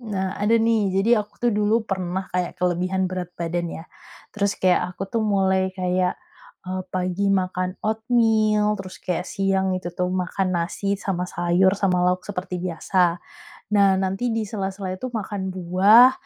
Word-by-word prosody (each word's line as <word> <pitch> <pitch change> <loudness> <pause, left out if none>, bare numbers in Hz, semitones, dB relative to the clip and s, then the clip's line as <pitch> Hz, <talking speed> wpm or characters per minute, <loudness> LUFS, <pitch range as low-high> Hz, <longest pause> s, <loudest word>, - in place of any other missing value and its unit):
Nah 195 -5 -3
ada 220 +3 +3
nih, 225 -3 +2
jadi 220 +3 +4
aku 210 - -10
tuh 240 - +3
dulu 210 +2 +1
pernah 190 -1 -3
kayak 180 -1 -2
kelebihan 180 +1 0
berat 185 -1 -3
badan 170 0 -2
ya. 165 0 -7 0.5
Terus 200 -1 -1
kayak 185 -1 +3 0.2
aku - - -5
tuh 230 - +1
mulai 190 -3 +2
kayak, 180 0 0 0.5
eee, 185 0 -3
pagi 185 +2 0
makan 185 -1 0
oatmeal, 220 -2 +2
terus 185 -1 -9
kayak 180 0 -3
siang 190 -1 0
gitu 180 -1 -5
tuh 180 0 -1
makan 185 +1 -1
nasi, 200 +3 -1
sama 190 -2 -2
sayur, 175 +2 +2
sama 185 -3 +1
lauk 180 0 +1
seperti 185 -2 -4
biasa. 175 0 +1 0.5
Nah 200 -2 +5
nanti 195 +5 -1
di 220 - 0
sela-sela 195 -2 -4
itu 255 +7 -5
makan 205 -4 -4
buah, 195 +8 +6
190 Hz, 160 wpm, -23 LUFS, 180-205 Hz, 0.5 s, buah